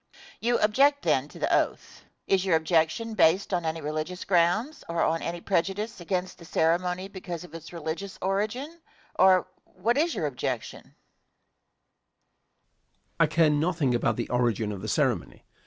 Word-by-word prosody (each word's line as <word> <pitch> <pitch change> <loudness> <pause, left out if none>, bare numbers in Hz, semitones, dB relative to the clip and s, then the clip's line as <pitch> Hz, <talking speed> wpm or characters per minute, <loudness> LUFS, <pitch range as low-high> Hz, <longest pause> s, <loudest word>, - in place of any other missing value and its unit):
Question. 390 0 -20
You 240 +1 +2
object 280 +7 +3
then - - +2
to - - -14
the - - +1
oath. - - -2 0.2
Is 190 -1 +2
your 185 -4 +3
objection 160 +7 +1
based 190 0 +3
on 175 -2 0
any 160 0 -2
religious 155 +5 -4
grounds, 195 - +1
or 170 0 0
on 165 +1 +1
any 170 0 -4
prejudice 195 +3 -1
against 180 +1 -3
the - - -12
ceremony 180 +3 0
because 180 -4 -7
of 175 - -13
its 165 -1 -9
religious 170 +4 -5
origin; 220 - -2 0.4
or 185 -1 +6 0.2
what 230 +9 -1
is 335 +2 +1
your 155 - -1
objection? 140 -4 -3
Answer. - - -24 2.2
I 165 - +5
care 160 +1 +3
nothing 150 -3 +1
about 120 - +1
the 120 - -3
origin 120 -3 0
of 100 -2 -6
the 110 - -5
ceremony. 120 - -1
175 Hz, 160 wpm, -27 LUFS, 160-200 Hz, 2.2 s, or